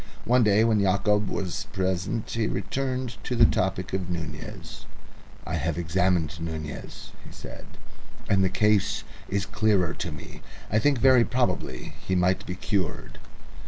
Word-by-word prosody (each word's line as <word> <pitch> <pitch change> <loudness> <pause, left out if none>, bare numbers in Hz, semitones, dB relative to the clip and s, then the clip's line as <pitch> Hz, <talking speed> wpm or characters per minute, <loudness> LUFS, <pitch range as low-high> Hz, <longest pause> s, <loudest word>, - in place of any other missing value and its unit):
One 125 +1 +4
day 105 0 +4
when 110 -2 +3
Yacob 100 +2 +2
was 90 -4 -3
present 95 +4 -1
he 115 -2 0
returned 130 -2 -3
to 125 - -2
the 115 -1 +7
topic 95 -2 0
of 95 -2 -2
Nunez. 85 -3 -6 0.6
"I - - -2
have 85 -1 -1
examined 85 -1 +1
Bogota," 80 -2 -5 0.4
he - - -12
said, - - -10 0.6
"and 95 -1 +3
the 95 - +3
case 105 +1 +2 0.3
is 100 -1 0
clearer 100 -5 +2
to 85 - -4
me. 75 - -10 0.3
I 105 - +4
think 145 +2 +3
very 130 0 +6
probably 120 - -1
he 95 - 0
might 90 +1 +1
be 90 - -3
cured." 95 -3 -3
95 Hz, 150 wpm, -26 LUFS, 90-110 Hz, 0.6 s, the